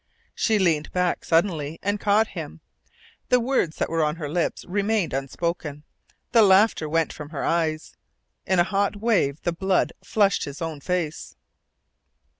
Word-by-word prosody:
She 220 -2 +1
leaned 165 -6 +1
back 180 -1 0
suddenly, 165 -3 0
and 205 +1 0
caught 210 +2 +2
him. 80 +1 -7 0.7
The 250 - +5
words 235 -10 0
that - - -1
were 165 -1 0
on 150 0 0
her 160 -3 -5
lips 170 +3 -2
remained 205 -2 0
unspoken. 150 +2 -3 0.5
The 230 - +6
laughter 195 -5 +4
went 165 +1 0
from 150 -1 -9
her 150 -3 -5
eyes. 160 -2 -1 0.5
In 185 - +2
a 175 - +6
hot 200 +2 0
wave 200 -10 +1
the 175 - 0
blood 190 +2 +1
flushed 200 -3 +2
his 140 +1 -8
own 165 -3 -4
face. 175 -2 -3
175 Hz, 155 wpm, -24 LUFS, 155-200 Hz, 0.7 s, The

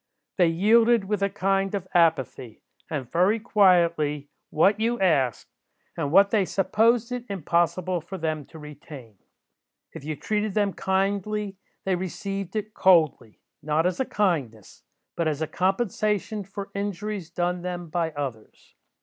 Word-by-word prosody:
They 175 - +6
yielded 225 +6 +4
with 205 0 -2
a 200 - +2
kind 195 0 0
of 190 -2 -4
apathy, 155 - +1 0.3
and 140 -6 -4
very 190 +6 +3
quietly, 170 -9 +2 0.2
what 195 +7 +3
you 235 +2 0
asked, 140 - +1 0.5
and 140 - -2
what 200 +3 +5
they 215 -3 +3
supposed 220 +6 +1
it 250 -1 -3
impossible 175 0 0
for 190 +4 -8
them 155 -3 -3
to - - -13
retain. 145 - -12 0.7
If - - -9
you 155 +1 -4
treated 210 +3 -2
them 205 -2 +1
kindly, 200 +1 -1 0.3
they 190 - +1
received 195 +2 -5
it 215 0 -3
coldly; 160 - +2 0.2
not 155 +2 0
as 180 +5 0
a 265 - +1
kindness, 145 - -2 0.3
but 170 - 0
as 150 -2 -1
a 160 - 0
compensation 205 +3 -1
for 200 +1 -8
injuries 200 -2 -4
done 175 +1 -2
them 175 -1 -5
by 165 0 -1
others. 130 -7 -7
185 Hz, 145 wpm, -25 LUFS, 160-205 Hz, 0.7 s, They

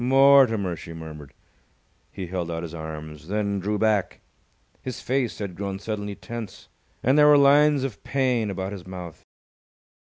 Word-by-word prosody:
"Mortimer!" 130 -8 +5
she 85 0 -9
murmured. 75 -4 -9 0.8
He 95 - -6
held 90 -1 -4
out 85 0 -3
his 85 -1 -7
arms, 80 -1 -8
then 100 0 -1
drew 105 +3 -1
back. 105 -3 +1 0.6
His 130 -2 -6
face 130 -2 -1
had 100 -3 -5
grown 100 0 -4
suddenly 105 0 -4
tense, 115 -4 -8 0.3
and 135 +4 +4
there 150 - +7
were 150 -1 +7
lines 145 0 +5
of 125 -7 -5
pain 125 -5 0
about 95 0 -4
his 95 -3 -8
mouth. 90 -3 -8
100 Hz, 155 wpm, -25 LUFS, 90-125 Hz, 0.8 s, there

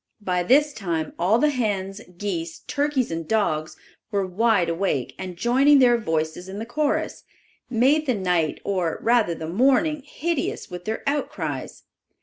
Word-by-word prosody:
By 180 -2 0
this 285 +10 +4
time 170 -7 -3
all 185 +6 +3
the 300 +4 +3
hens, 205 -5 -2 0.2
geese, 170 -4 -4
turkeys 285 - 0
and 165 -1 -4
dogs 155 -8 0 0.3
were 200 -3 0
wide 200 0 +2
awake 165 -7 -1
and 185 -2 -6
joining 265 +8 +4
their 250 -3 +6
voices 160 -2 -2
in 195 - -6
the 220 - -4
chorus, 290 +4 -1 0.5
made 275 +6 +3
the 255 - +2
night, 180 -5 0
or 185 -5 -1
rather 230 -7 +3
the 160 - -6
morning, 265 - +2
hideous 305 - -3
with 180 0 -7
their 220 +1 -3
outcries. 285 +1 -3
205 Hz, 150 wpm, -24 LUFS, 175-260 Hz, 0.5 s, their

